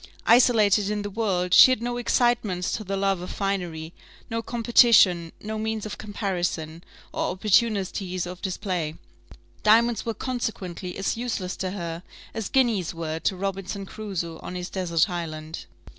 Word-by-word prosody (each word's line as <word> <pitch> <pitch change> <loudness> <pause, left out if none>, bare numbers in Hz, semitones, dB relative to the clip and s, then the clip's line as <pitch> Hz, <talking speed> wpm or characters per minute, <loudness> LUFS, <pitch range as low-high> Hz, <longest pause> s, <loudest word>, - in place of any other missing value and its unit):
Isolated 215 -4 +5
in 210 -1 -2
the 205 - -5
world, 190 -4 -1
she - - +10
had 255 - +2
no 240 +1 -3
excitements 235 -7 +1
to 215 - -3
the 195 0 -3
love 195 -2 0
of 180 - -6
finery, 175 -5 -3 0.4
no 230 0 -1
competition, 225 -8 +4
no 215 +1 -5
means 220 -1 -2
of 210 - -6
comparison, 175 -6 -3 0.3
or - - -1
opportunities 190 -2 +1
of 180 0 -8
display; 180 -5 -3 0.7
diamonds 230 +2 +4
were 230 -1 -3
consequently 205 -8 -4
as 195 +3 -1
useless 225 -6 -3
to 190 - -2
her 170 -3 -5 0.3
as 220 -3 -4
guineas 225 -11 +1
were 160 -1 -3
to 190 - 0
Robinson 195 +1 -4
Crusoe 190 -6 -5
on 180 - -7
his 180 0 -5
desert 170 -3 +1
island. 160 -3 -6
195 Hz, 150 wpm, -25 LUFS, 180-220 Hz, 0.7 s, she